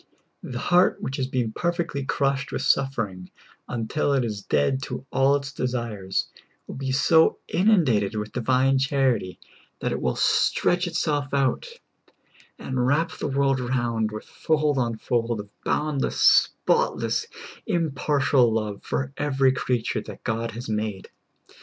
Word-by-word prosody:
The 120 Hz, -, -6 dB
heart 175 Hz, +7 st, +3 dB
which 130 Hz, -, -4 dB
has 130 Hz, -, -1 dB
been 125 Hz, -4 st, -1 dB
perfectly 170 Hz, -1 st, -2 dB
crushed 140 Hz, 0 st, -1 dB
with -, -, -3 dB
suffering 110 Hz, -10 st, 0 dB, 0.4 s
until 120 Hz, +5 st, -1 dB
it 135 Hz, -3 st, +2 dB
is 105 Hz, -3 st, -4 dB
dead 95 Hz, -, +1 dB
to -, -, -6 dB
all 135 Hz, +1 st, +3 dB
its 140 Hz, 0 st, -3 dB
desires 115 Hz, -8 st, -2 dB, 0.4 s
will -, -, -8 dB
be 130 Hz, 0 st, -3 dB
so 160 Hz, +4 st, +4 dB
inundated 150 Hz, -, +2 dB
with 105 Hz, 0 st, -4 dB
divine 130 Hz, +2 st, +2 dB
charity 130 Hz, -8 st, 0 dB, 0.4 s
that -, -, -2 dB
it -, -, -3 dB
will 65 Hz, -, 0 dB
stretch 175 Hz, 0 st, +2 dB
itself 145 Hz, -5 st, -1 dB
out, 135 Hz, -, +1 dB, 0.9 s
and 125 Hz, -1 st, -2 dB
wrap 150 Hz, +5 st, +1 dB
the -, -, -4 dB
world 135 Hz, -1 st, +1 dB
round 120 Hz, -3 st, -1 dB
with 110 Hz, 0 st, -7 dB
fold 150 Hz, -3 st, 0 dB
on 115 Hz, -2 st, -1 dB
fold 115 Hz, 0 st, -1 dB
of 105 Hz, 0 st, -8 dB
boundless, 150 Hz, -3 st, -1 dB
spot 485 Hz, +1 st, +3 dB
less, 445 Hz, -, -1 dB, 0.4 s
impartial 145 Hz, -, +2 dB
love 105 Hz, -2 st, -2 dB
for 135 Hz, 0 st, -3 dB
every 135 Hz, -2 st, +2 dB
creature 125 Hz, -3 st, -1 dB
that -, -, -11 dB
God 115 Hz, +1 st, -2 dB
has 120 Hz, +3 st, -7 dB
made. 105 Hz, -2 st, -3 dB
130 Hz, 145 wpm, -24 LUFS, 115-140 Hz, 0.9 s, so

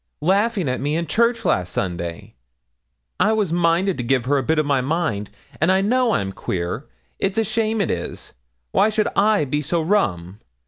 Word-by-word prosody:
laughing 200 Hz, +1 st, +2 dB
at 125 Hz, 0 st, -1 dB
me 145 Hz, +3 st, -1 dB
in 170 Hz, +1 st, -1 dB
church 235 Hz, +7 st, +1 dB
last 90 Hz, -1 st, +1 dB
Sunday. 85 Hz, -2 st, -4 dB, 0.9 s
I 220 Hz, -, +3 dB
was 205 Hz, -6 st, 0 dB
minded 175 Hz, +1 st, +2 dB
to -, -, -1 dB
give 125 Hz, 0 st, +1 dB
her 140 Hz, +2 st, +2 dB
a -, -, -2 dB
bit 160 Hz, +5 st, +1 dB
of 155 Hz, -, +2 dB
my 140 Hz, -2 st, +2 dB
mind. 135 Hz, -, -1 dB, 0.3 s
An' 160 Hz, -, +3 dB
I 190 Hz, +1 st, +4 dB
know 240 Hz, +3 st, +2 dB
I'm 95 Hz, -, -1 dB
queer. 90 Hz, +7 st, -4 dB, 0.3 s
It's 195 Hz, +2 st, -1 dB
a 225 Hz, -, +3 dB
shame, 220 Hz, +1 st, -1 dB
it 200 Hz, -, +1 dB
is. 85 Hz, -, -5 dB, 0.4 s
Why 210 Hz, -, +3 dB
should 215 Hz, +1 st, 0 dB
I 205 Hz, -5 st, +3 dB
be 145 Hz, +2 st, -1 dB
so 165 Hz, +4 st, -1 dB
rum? 105 Hz, -, 0 dB
165 Hz, 190 wpm, -21 LUFS, 125-210 Hz, 0.9 s, I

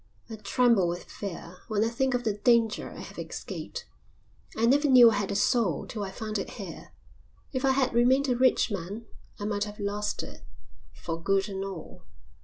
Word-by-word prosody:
"I -, -, -4 dB
tremble 225 Hz, -2 st, +3 dB
with 175 Hz, +1 st, -3 dB
fear 180 Hz, -2 st, -8 dB
when 215 Hz, -1 st, +1 dB
I 225 Hz, -, +1 dB
think 260 Hz, +2 st, 0 dB
of 245 Hz, -, -1 dB
the 215 Hz, -, +1 dB
danger 225 Hz, +1 st, +2 dB
I -, -, -9 dB
have -, -, -9 dB
escaped. -, -, -6 dB, 0.7 s
I 225 Hz, -, +3 dB
never 285 Hz, +4 st, +4 dB
knew 245 Hz, -3 st, +9 dB
I -, -, 0 dB
had 205 Hz, -1 st, -1 dB
a 200 Hz, -, -2 dB
soul 205 Hz, -, +2 dB
till 215 Hz, -, -6 dB
I 195 Hz, -, -4 dB
found 215 Hz, +1 st, -4 dB
it -, -, -4 dB
here. -, -, -8 dB, 0.6 s
If 260 Hz, 0 st, -2 dB
I 270 Hz, -1 st, +4 dB
had 265 Hz, -2 st, +1 dB
remained 255 Hz, +4 st, +4 dB
a 250 Hz, -, +2 dB
rich 255 Hz, -2 st, +3 dB
man 200 Hz, +4 st, -5 dB, 0.3 s
I 205 Hz, -, -4 dB
might 205 Hz, -1 st, 0 dB
have 210 Hz, 0 st, -9 dB
lost 205 Hz, +1 st, -2 dB
it -, -, -10 dB, 0.5 s
for 165 Hz, 0 st, -6 dB
good 195 Hz, +3 st, +1 dB
and 195 Hz, -1 st, -4 dB
all." 190 Hz, -5 st, -8 dB
215 Hz, 200 wpm, -28 LUFS, 195-245 Hz, 0.7 s, knew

